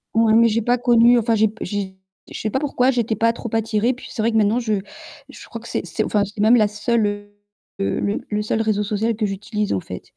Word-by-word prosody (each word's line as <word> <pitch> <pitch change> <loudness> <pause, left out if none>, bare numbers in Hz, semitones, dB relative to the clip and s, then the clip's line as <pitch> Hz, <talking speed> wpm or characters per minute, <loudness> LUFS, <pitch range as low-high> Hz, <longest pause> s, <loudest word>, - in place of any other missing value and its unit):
Oui, 225 -1 +4
mais 230 0 +6
j'ai 230 +1 0
pas 245 +3 +1
connu, 240 0 +5
enfin 230 0 +1
j'ai 220 +1 +3
p 215 +2 -7
j 190 -1 -4 0.3
je - - -7
sais 215 - -2
pas 265 - 0
pourquoi 265 -3 +1
j'étais 235 -3 -1
pas 230 0 +2
trop 235 0 -7
attirée, 225 +2 +1
puis 250 - -12
c'est 220 - -4
vrai 230 - +1
que 225 - +1
maintenant 215 +3 +2
je 225 -3 -1 0.6
je - - -12
crois - - -7
que - - -12
c'est - - -3
c'est - - -2
enfin 205 -1 +1
c'est 205 +1 -8
même 220 +4 +5
la 215 -3 +4
seule, 215 +2 0
heu, 205 0 -6 0.5
le 200 +1 -1
le 210 0 -1
seul 220 +1 -1
réseau 215 -2 0
social 215 +3 -1
que 215 0 -1
j'utilise 210 +1 -3
en 95 - 0
fait. 90 0 -8
220 Hz, 255 wpm, -21 LUFS, 210-235 Hz, 0.6 s, mais